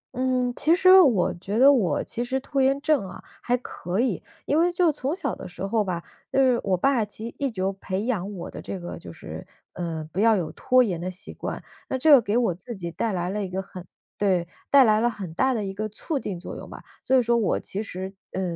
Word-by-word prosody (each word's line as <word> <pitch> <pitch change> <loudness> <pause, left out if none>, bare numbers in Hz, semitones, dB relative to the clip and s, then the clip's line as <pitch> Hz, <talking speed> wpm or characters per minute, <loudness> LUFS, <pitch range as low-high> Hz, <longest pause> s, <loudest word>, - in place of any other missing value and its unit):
嗯， 255 -1 0
其 320 +3 +4
实 370 +1 +8
我 235 - +3
觉 195 +5 -4
得 275 +3 +7
我 185 - +1
其 240 - -3
实 260 +2 -1
拖 275 0 -1
延 270 +1 +3
症 285 -11 +1
啊 - - -11 0.2
还 245 +1 +1
可 185 -6 -5
以， 235 -6 0 0.2
因 295 - +2
为 350 +1 +3
就 350 -2 +3
从 285 +1 -3
小 380 - -2
的 - - -8
时 180 - -6
候 215 +2 +1
吧， 175 -4 -3 0.3
就 - - -1
是 255 -3 +4
我 190 -2 +1
爸 245 +3 +2
其 210 +2 -6
实 - - -16
一 280 -1 0
直 210 -6 -6
有 190 +1 0
培 195 +1 -4
养 205 -5 -1
我 175 - -7
的 - - -8
这 195 - -6
个 175 - -7
就 - - -10
是， - - -9 0.3
呃， 165 -3 -4
不 190 - -2
要 225 +1 +5
有 175 -6 -2
拖 255 0 +3
延 180 -7 -2
的 180 - -3
习 185 +2 -7
惯， - - -5 0.3
那 265 - -1
这 310 +4 +4
个 275 -4 +9
给 215 +1 0
我 230 -7 +2
自 190 +8 -9
己 170 -3 -5
带 215 +7 -1
来 180 -1 -2
了 210 +1 -2
一 190 - -4
个 190 +1 -3
很 185 -2 -11 0.3
对， 185 -4 +1 0.2
带 280 -1 +7
来 215 -3 +4
了 240 +2 +2
很 195 -8 -7
大 260 +8 +2
的 215 -3 -2
一 195 - -4
个 215 +2 -3
促 280 - -3
进 195 -8 -5
作 175 - -8
用 - - -9
吧， - - -10 0.2
所 265 - +3
以 - - +5
说 235 +1 +2
我 220 -5 +1
其 200 - -4
实， 190 -2 -6 0.2
呃， 190 - -2
215 Hz, 275 characters per minute, -25 LUFS, 185-260 Hz, 0.3 s, 个